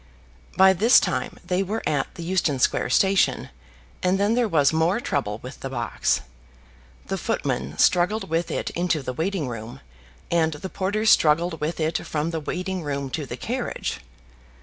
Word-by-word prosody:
By 190 0 +7
this 220 +7 +6
time - - -2
they 180 +1 0
were 210 +4 -3
at 145 -3 -1
the 170 - -7
Euston 170 -5 0
Square 125 - +1
station, 195 +8 +2 0.5
and 185 +1 +1
then 205 +2 +2
there 240 -1 +2
was 150 -6 +3
more 165 +6 +2
trouble 105 - -2
with 130 +2 -9
the 135 - -5
box. 120 -3 0 0.8
The - - -3
footman 70 +4 -2
struggled 180 +5 +3
with 165 +1 -1
it - - -2
into 170 -4 -1
the 130 - -4
waiting 165 +1 -2
room, 115 -1 -7 0.5
and 160 -2 +2
the 150 +6 -7
porter 205 +4 -2
struggled 165 -4 +4
with 155 +3 -2
it 160 +1 0
from 155 +2 -2
the 165 - -2
waiting 185 +4 -3
room 140 -3 -3
to 150 -1 -3
the 120 - -6
carriage. 245 - -3
165 Hz, 170 wpm, -24 LUFS, 145-190 Hz, 0.8 s, By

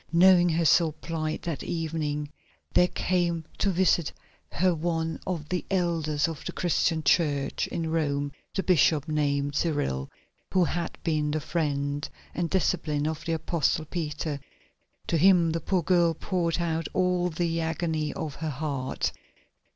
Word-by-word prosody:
Knowing 175 +1 +6
her 165 0 +1
sore 160 0 +4
plight, 155 -1 -4
that 165 -4 -3
evening 155 -3 -2 0.5
there 180 - +5
came 175 -3 0
to 200 - +2
visit 180 -3 +2 0.4
her 180 +3 +3
one 165 0 -2
of 165 -5 -3
the 180 -1 -1
elders 165 -5 +1
of 165 -3 -6
the - - -4
Christian 165 -2 +1
Church 145 -5 +1
in 165 -1 -3
Rome, 145 -3 0 0.3
a 190 - +1
bishop 160 -4 +3
named 145 -2 0
Cyril, 145 - -1 0.4
who 185 -1 +4
had 170 0 -2
been 155 -3 +1
the 155 +1 0
friend 145 -2 -2 0.2
and 170 -1 -1
disciple 160 -5 0
of 160 0 -3
the 165 - 0
Apostle 160 -1 0
Peter. 150 -3 -3 0.7
To 170 - +1
him 175 -1 +5
the 165 +1 -2
poor 180 +1 0
girl 170 -1 +3
poured 175 -1 -1
out 165 -1 -1
all 180 -1 +2
the 165 0 -1
agony 160 -2 -1
of 155 -3 -4
her 160 0 -3
heart. 140 -2 -2
165 Hz, 150 wpm, -27 LUFS, 150-175 Hz, 0.7 s, Knowing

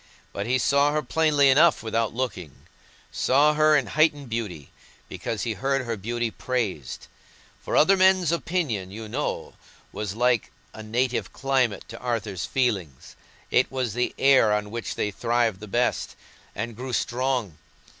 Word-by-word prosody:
But 100 - -4
he 130 +2 +2
saw 140 +3 +2
her 155 0 0
plainly 150 -4 +3
enough 155 +2 +4
without 115 0 -1
looking; 100 - -5 0.5
saw 145 +3 +3
her 155 0 +4
in 135 - 0
heightened 145 -2 +1
beauty, 105 -11 -5 0.4
because 110 - -4
he 115 -3 -1
heard 135 +2 -1
her 115 -1 -2
beauty 115 +3 -3
praised—for 110 - -5
other 195 +6 +6
men's 185 -3 +4
opinion, 160 - -2
you 110 +3 -8
know, 130 +7 -3 0.4
was 105 -2 -5
like 125 0 +1 0.2
a 110 - -9
native 120 +3 -1
climate 130 -6 0
to 115 - -9
Arthur's 110 -6 -3
feelings: 100 - -2 0.4
it 125 - +3
was 130 -5 -2
the 125 +1 -1
air 135 -6 +5
on 105 0 -1
which 115 0 -4
they 105 - -1
thrived 115 -1 0
the 105 - -9
best, 120 +5 -1 0.4
and 115 +2 -4
grew 125 +2 -6
strong. 125 - -1
120 Hz, 150 wpm, -25 LUFS, 110-135 Hz, 0.5 s, other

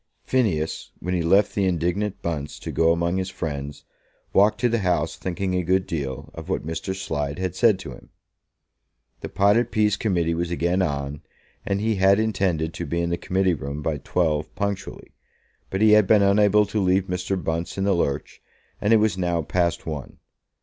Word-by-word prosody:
Phineas, 95 -12 0
when 90 +2 -3
he 90 - +1
left 95 +5 +3
the 100 - +1
indignant 90 +3 -1
Bunce 75 -4 -3
to - - -6
go 80 0 +3
among 85 +2 0
his 95 0 -2
friends, 70 -5 -5 0.5
walked 105 +2 +4
to 125 - +4
the 115 -1 0
House 90 -5 0
thinking 95 +1 -3
a 90 - +1
good 95 +2 +1
deal 70 -5 -4
of - - -9
what - - -2
Mr. 80 +4 -4
Slide 75 -7 -3
had 95 -1 -3
said 110 -1 +4
to 90 - -8
him. - - -13 1.1
The - - -6
potted 100 +5 +3
peas 105 -1 +2
Committee 85 -6 0
was 85 +1 -2
again 85 +2 0
on, 70 -3 -2 0.5
and 100 0 0
he 110 0 0
had 95 +2 +4
intended 95 -7 0
to 85 - -5
be 85 +4 -1
in 85 0 -1
the - - +2
Committee 95 +1 0
Room 70 0 -5
by 75 -2 -1
twelve 75 -1 -1
punctually: 100 -1 -4 0.6
but 95 - -2
he 110 0 +6
had 105 -2 +6
been 105 0 +5
unable 105 +1 +4
to 105 +1 -2
leave 95 0 +3
Mr. 90 +1 -2
Bunce 85 +1 -3
in 95 - 0
the 100 0 +3
lurch, 70 -6 -2 0.4
and 105 +2 +3
it - - +7
was 105 -3 +1
now 85 -2 0
past 85 +2 0
one. 75 -5 -6
90 Hz, 190 wpm, -24 LUFS, 80-100 Hz, 1.1 s, it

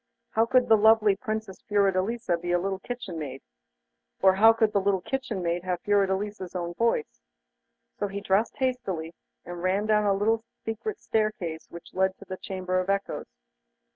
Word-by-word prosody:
How 225 +1 +2
could 250 +1 +4
the 220 - +6
lovely 215 -1 +5
Princess 215 -2 -5
Fiordelisa 200 0 +1
be 175 +1 -4
a 175 - +4
little 190 +1 -2
kitchen 225 -6 -6
maid? 135 -3 -6 0.8
or 190 0 +6
how 220 +4 +7
could 220 -1 +1
a 200 - +4
little 195 -1 +1
kitchen 250 -5 -3
maid 170 +1 -1
have 180 -1 -2
Fiordelisa's 200 -1 0
own 175 -1 -3
voice? 235 - -1 0.8
So 205 - 0
he 200 0 -5
dressed 200 +2 +1
hastily, 200 - -2 0.3
and 175 0 -7
ran 190 +3 +1
down 210 -1 +3
a 200 - +4
little 220 +3 +1 0.2
secret 315 - -4
staircase 210 -7 -2
which 170 - -11
led 190 0 +1
to 200 - -13
the 185 -1 -6
Chamber 185 -1 -2
of 185 +1 -3
Echoes. 200 0 -1
200 Hz, 170 wpm, -27 LUFS, 185-220 Hz, 0.8 s, how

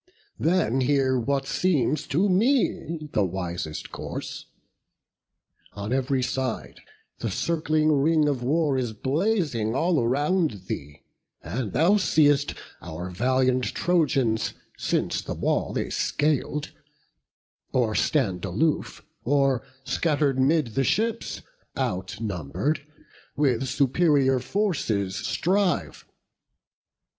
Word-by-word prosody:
Then 160 -7 +2
hear 130 -1 +2
what 135 +3 0
seems 150 -3 +1
to 180 +8 +2
me 185 - +1
the 105 - +3
wisest 85 -4 -4
course. - - -6 1.3
On 105 +4 -4
ev'ry 135 0 +1
side 125 - -3 0.4
the - - -2
circling 155 -2 +1
ring 150 +1 +3
of 140 -4 0
war 145 +1 +1
Is 120 -3 -2
blazing 135 - 0
all 165 +1 +2
around 145 - +1
thee; 75 -4 -6 0.4
and, 115 -5 -4
thou 185 +6 +4
seest, 145 -6 +3 0.3
Our 90 +2 -6
valiant 130 +5 +2
Trojans, 135 -10 +1 0.2
since - - -1
the - - -5
wall - - 0
they - - -2
scal'd, 150 0 0 1.0
Or 120 -4 +1
stand 105 - +1
aloof, 120 - -1 0.2
or 135 -1 +2 0.2
scatter'd 145 -5 +1
'mid 135 -3 +2
the 135 - +1
ships 225 - -1 0.3
Outnumber'd, 105 - -2 0.6
with 135 -3 +2
superior 140 -1 +3
forces 125 - -1
strive. 180 - 0
135 Hz, 100 wpm, -25 LUFS, 115-155 Hz, 1.3 s, thou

